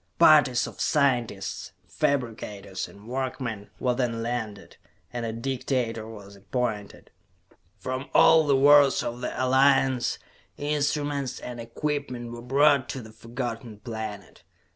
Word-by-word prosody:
Parties 135 Hz, -5 st, +6 dB
of -, -, -8 dB
scientists, 125 Hz, -9 st, 0 dB
fabricators, 105 Hz, -7 st, -2 dB
and 100 Hz, +2 st, -15 dB
workmen 125 Hz, -5 st, -4 dB
were 125 Hz, -1 st, +1 dB
then 120 Hz, -2 st, -1 dB
landed, 115 Hz, -4 st, -5 dB, 0.4 s
and 120 Hz, -1 st, -3 dB
a -, -, -2 dB
dictator 115 Hz, -2 st, -2 dB
was 100 Hz, -3 st, -11 dB
appointed. 105 Hz, 0 st, -4 dB, 0.7 s
From 130 Hz, +2 st, -4 dB
all 160 Hz, -1 st, +6 dB
the 140 Hz, -, +4 dB
worlds 145 Hz, 0 st, +6 dB
of 120 Hz, +1 st, -4 dB
the -, -, -2 dB
Alliance, 130 Hz, -1 st, +3 dB, 0.4 s
instruments 145 Hz, -2 st, -1 dB
and 125 Hz, -1 st, -7 dB
equipment 125 Hz, 0 st, -4 dB
were 120 Hz, 0 st, -8 dB
brought 140 Hz, +1 st, +3 dB
to 130 Hz, -, -4 dB
the 110 Hz, -, -12 dB
Forgotten 115 Hz, 0 st, -6 dB
Planet. 110 Hz, -4 st, -7 dB
125 Hz, 120 wpm, -26 LUFS, 115-135 Hz, 0.7 s, Parties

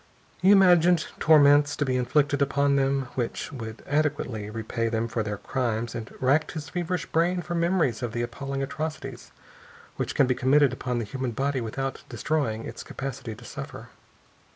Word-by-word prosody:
He 185 Hz, -, +5 dB
imagined 180 Hz, -4 st, +6 dB
torments 145 Hz, -2 st, +6 dB
to 145 Hz, -, 0 dB
be 130 Hz, -1 st, 0 dB
inflicted 140 Hz, +3 st, +1 dB
upon 140 Hz, 0 st, +2 dB
them 135 Hz, -1 st, +1 dB
which 120 Hz, -3 st, -3 dB
would 115 Hz, -4 st, -7 dB
adequately 140 Hz, -8 st, -1 dB
repay 115 Hz, +1 st, -2 dB
them 115 Hz, 0 st, -1 dB
for 115 Hz, 0 st, -2 dB
their 105 Hz, -1 st, -3 dB
crimes, 120 Hz, -3 st, -2 dB
and 115 Hz, -1 st, -6 dB
racked 140 Hz, +4 st, +2 dB
his 155 Hz, -1 st, -6 dB
feverish 180 Hz, +1 st, -2 dB
brain 175 Hz, +2 st, +1 dB
for 175 Hz, -, -5 dB
memories 170 Hz, -, +1 dB
of 120 Hz, -2 st, -2 dB
the 120 Hz, +1 st, -2 dB
appalling 135 Hz, +2 st, -4 dB
atrocities 135 Hz, -4 st, -5 dB, 0.7 s
which -, -, -3 dB
can 140 Hz, -, +5 dB
be 125 Hz, -, +2 dB
committed 135 Hz, +1 st, +3 dB
upon 125 Hz, -1 st, -3 dB
the 115 Hz, -, -2 dB
human 130 Hz, +1 st, -4 dB
body 135 Hz, +2 st, -1 dB
without 135 Hz, +4 st, -4 dB
destroying 125 Hz, -8 st, -1 dB
its -, -, -7 dB
capacity 135 Hz, -4 st, -6 dB
to 120 Hz, +2 st, -14 dB
suffer. -, -, -8 dB
135 Hz, 170 wpm, -26 LUFS, 120-150 Hz, 0.7 s, imagined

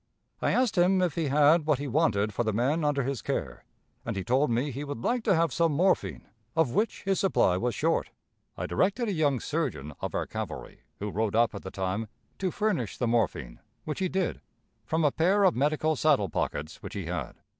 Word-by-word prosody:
I -, -, +2 dB
asked 235 Hz, -6 st, +2 dB
him 185 Hz, +2 st, +4 dB
if 175 Hz, -4 st, +1 dB
he 165 Hz, -3 st, -1 dB
had 150 Hz, +3 st, +4 dB
what 150 Hz, -3 st, +3 dB
he 145 Hz, +2 st, -4 dB
wanted 110 Hz, -8 st, +1 dB
for 120 Hz, -, 0 dB
the 110 Hz, -, 0 dB
men 135 Hz, +9 st, +1 dB
under 145 Hz, -2 st, +1 dB
his 135 Hz, -1 st, -3 dB
care, -, -, -3 dB, 0.4 s
and -, -, -3 dB
he 95 Hz, -, -2 dB
told 130 Hz, +8 st, +2 dB
me 125 Hz, +5 st, 0 dB
he 135 Hz, +3 st, -5 dB
would 145 Hz, -5 st, -6 dB
like 245 Hz, -1 st, 0 dB
to 195 Hz, -, +4 dB
have 165 Hz, 0 st, +1 dB
some 165 Hz, -2 st, +2 dB
morphine, 185 Hz, +6 st, +1 dB, 0.3 s
of 160 Hz, -6 st, +2 dB
which 220 Hz, +8 st, 0 dB
his 195 Hz, -1 st, +1 dB
supply 175 Hz, -, +3 dB
was 120 Hz, +4 st, -1 dB
short. -, -, 0 dB, 0.5 s
I -, -, -3 dB
directed 205 Hz, -, +1 dB
a -, -, 0 dB
young 145 Hz, -6 st, +1 dB
surgeon 75 Hz, -7 st, -3 dB
of -, -, -3 dB
our -, -, 0 dB
cavalry, -, -, -6 dB, 0.2 s
who 105 Hz, 0 st, -4 dB
rode 110 Hz, +1 st, -1 dB
up 115 Hz, 0 st, +3 dB
at 100 Hz, -, -6 dB
the 95 Hz, -, -7 dB
time, 95 Hz, +4 st, -3 dB, 0.3 s
to 190 Hz, -, 0 dB
furnish 180 Hz, -, -1 dB
the 125 Hz, -, 0 dB
morphine, 105 Hz, -, -1 dB, 0.2 s
which 150 Hz, -, -4 dB
he 185 Hz, -1 st, 0 dB
did, 190 Hz, -1 st, -1 dB, 0.5 s
from 160 Hz, 0 st, +1 dB
a 145 Hz, -, +4 dB
pair 190 Hz, +7 st, +2 dB
of 185 Hz, -, +4 dB
medical 155 Hz, +3 st, +1 dB
saddle 140 Hz, -9 st, +2 dB
pockets 75 Hz, +2 st, -3 dB
which -, -, -8 dB
he -, -, -4 dB
had. -, -, -4 dB
145 Hz, 215 wpm, -28 LUFS, 115-170 Hz, 0.5 s, him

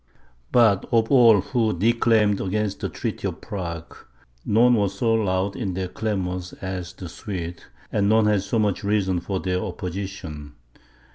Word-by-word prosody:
But 110 Hz, -5 st, +4 dB
of 115 Hz, +1 st, +2 dB
all 115 Hz, -7 st, +7 dB
who 110 Hz, -3 st, 0 dB
declaimed 110 Hz, -1 st, +3 dB
against 100 Hz, +1 st, -1 dB
the -, -, -3 dB
treaty -, -, -3 dB
of -, -, -5 dB
Prague, 85 Hz, -5 st, -6 dB, 0.5 s
none 120 Hz, +4 st, +4 dB
were 100 Hz, -4 st, +2 dB
so 115 Hz, +4 st, 0 dB
loud 100 Hz, -2 st, 0 dB
in 95 Hz, -7 st, -3 dB
their 95 Hz, 0 st, -2 dB
clamours 90 Hz, -4 st, -3 dB
as 95 Hz, -2 st, -6 dB
the 90 Hz, -, -8 dB
Swedes, 85 Hz, -1 st, -6 dB, 0.3 s
and 100 Hz, -1 st, +1 dB
none 110 Hz, 0 st, +4 dB
had 105 Hz, -2 st, +3 dB
so 100 Hz, +4 st, -2 dB
much 105 Hz, -2 st, 0 dB
reason 100 Hz, -3 st, +1 dB
for 95 Hz, +2 st, -3 dB
their 90 Hz, -1 st, -1 dB
opposition. 90 Hz, -6 st, -6 dB
100 Hz, 155 wpm, -24 LUFS, 90-110 Hz, 0.5 s, all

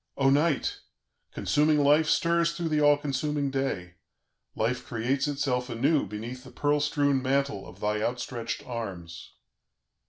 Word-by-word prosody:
"O 135 Hz, -1 st, +4 dB
Night! 145 Hz, 0 st, +1 dB, 0.5 s
consuming 150 Hz, +1 st, +2 dB
Life 150 Hz, +2 st, +4 dB
stirs 170 Hz, +1 st, +2 dB
through 170 Hz, -1 st, -3 dB
the 155 Hz, -1 st, +1 dB
all 145 Hz, 0 st, +6 dB
consuming 145 Hz, 0 st, -2 dB
day; 95 Hz, -10 st, -3 dB, 0.6 s
Life 120 Hz, +3 st, -1 dB
creates 130 Hz, +5 st, -1 dB
itself 135 Hz, -3 st, -1 dB
anew 140 Hz, +6 st, +1 dB
beneath 120 Hz, +4 st, -7 dB
the 130 Hz, -, -12 dB
pearl 145 Hz, +2 st, +1 dB
strewn 145 Hz, -2 st, +1 dB
mantle 135 Hz, -5 st, -1 dB
of 90 Hz, +2 st, -14 dB
thy 105 Hz, 0 st, 0 dB
outstretched 120 Hz, 0 st, -3 dB
arms...." 95 Hz, -9 st, -7 dB
135 Hz, 135 wpm, -27 LUFS, 115-145 Hz, 0.6 s, all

